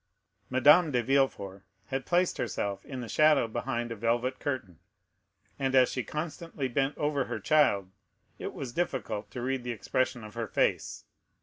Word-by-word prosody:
Madame 150 Hz, +6 st, +6 dB
de 125 Hz, -4 st, +1 dB
Villefort 115 Hz, -8 st, +1 dB, 0.3 s
had 135 Hz, -1 st, -3 dB
placed 180 Hz, +1 st, +2 dB
herself 100 Hz, -1 st, -2 dB
in 130 Hz, -2 st, -6 dB
the 120 Hz, -, -6 dB
shadow 150 Hz, +1 st, +4 dB
behind 120 Hz, +1 st, -3 dB
a -, -, -3 dB
velvet 120 Hz, +4 st, 0 dB
curtain, 110 Hz, -, -4 dB, 0.8 s
and 135 Hz, -1 st, 0 dB
as 130 Hz, -1 st, +5 dB
she 125 Hz, -, -2 dB
constantly 155 Hz, +1 st, -4 dB
bent 135 Hz, +3 st, 0 dB
over 145 Hz, -3 st, 0 dB
her -, -, -4 dB
child, 105 Hz, -12 st, +3 dB, 0.5 s
it -, -, -4 dB
was 125 Hz, -3 st, -6 dB
difficult 110 Hz, -, -2 dB
to 120 Hz, +4 st, -6 dB
read 130 Hz, 0 st, -1 dB
the 125 Hz, -, -5 dB
expression 125 Hz, +2 st, -1 dB
of 105 Hz, 0 st, -10 dB
her 115 Hz, -1 st, -3 dB
face. -, -, 0 dB
130 Hz, 165 wpm, -29 LUFS, 115-140 Hz, 0.8 s, Madame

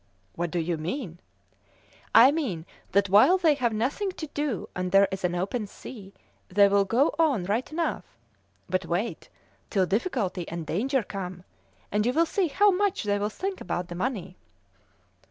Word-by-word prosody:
"What 175 Hz, 0 st, -2 dB
do 175 Hz, -, -3 dB
you 170 Hz, 0 st, -1 dB
mean?" 175 Hz, -, -5 dB, 1.0 s
"I 245 Hz, +4 st, +9 dB
mean 235 Hz, -, -2 dB, 0.3 s
that 200 Hz, +1 st, +3 dB
while 210 Hz, -, +6 dB
they 330 Hz, -5 st, +4 dB
have 250 Hz, -5 st, 0 dB
nothing 260 Hz, -, -1 dB
to 320 Hz, -, -6 dB
do, 290 Hz, -8 st, -2 dB
and 185 Hz, 0 st, -2 dB
there 195 Hz, +1 st, +6 dB
is 190 Hz, 0 st, -5 dB
an 175 Hz, 0 st, 0 dB
open 205 Hz, +5 st, -2 dB
sea, 200 Hz, -1 st, -11 dB, 0.4 s
they 200 Hz, +2 st, +5 dB
will 200 Hz, 0 st, +3 dB
go 245 Hz, +9 st, +2 dB
on 285 Hz, -, +3 dB
right 215 Hz, +10 st, -1 dB
enough; 320 Hz, -, -1 dB, 0.6 s
but 185 Hz, +1 st, -1 dB
wait 180 Hz, +7 st, -3 dB, 0.4 s
till 190 Hz, -3 st, +2 dB
difficulty 200 Hz, -, -1 dB
and 170 Hz, -1 st, -5 dB
danger 255 Hz, -, 0 dB
come, 185 Hz, -3 st, -6 dB, 0.5 s
and 210 Hz, +1 st, +1 dB
you 250 Hz, -, +1 dB
will 330 Hz, +4 st, +3 dB
see 375 Hz, +2 st, 0 dB
how 405 Hz, +7 st, +4 dB
much 395 Hz, +1 st, 0 dB
they'll 205 Hz, 0 st, 0 dB
think 380 Hz, -, -4 dB
about 175 Hz, 0 st, -3 dB
the -, -, -5 dB
money!" 185 Hz, -1 st, -3 dB
205 Hz, 170 wpm, -27 LUFS, 180-275 Hz, 1.0 s, I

